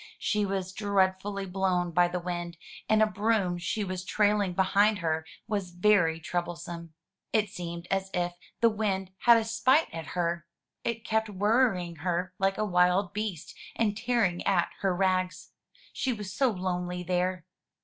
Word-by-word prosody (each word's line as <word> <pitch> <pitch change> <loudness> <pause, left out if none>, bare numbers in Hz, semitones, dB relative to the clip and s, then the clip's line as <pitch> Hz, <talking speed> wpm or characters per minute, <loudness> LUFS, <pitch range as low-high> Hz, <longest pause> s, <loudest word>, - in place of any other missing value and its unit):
She 210 -1 0
was 190 -1 -3
dreadfully 200 -1 0
blown 180 -2 0
by 175 +1 +4
the 180 +1 -3
wind, 175 -1 -4 0.3
and 220 0 +5
a - - +6
broom 210 -4 0
she 210 +4 -2
was 185 -2 -4
trailing 205 -1 +2
behind 200 +3 +3
her 160 -3 -1 0.2
was 200 -4 -2
very 175 -3 +3
troublesome. 170 -1 -5 0.4
It 215 -2 +2
seemed 170 -2 -6
as 195 0 0
if 175 -1 -1 0.3
the 230 - +6
wind 195 -3 -1
had 235 -1 +8
a 225 - +1
spite 230 - +2
at 165 -1 -6
her 170 -1 -1 0.2
— - - -59
it 230 -2 -3
kept 220 -1 0
worrying 200 -4 +1
her 180 +3 -2
like 195 0 +1
a 215 - 0
wild 180 0 +2
beast, 205 -6 -4 0.2
and 210 -3 +1
tearing 225 -6 +1
at 190 -4 +2
her 195 -2 +1
rags. 185 -1 0 0.4
She 260 - -1
was 205 -4 -6
so 265 +4 +3
lonely 180 -3 -3
there! 180 -1 -1
190 Hz, 160 wpm, -28 LUFS, 175-210 Hz, 0.4 s, had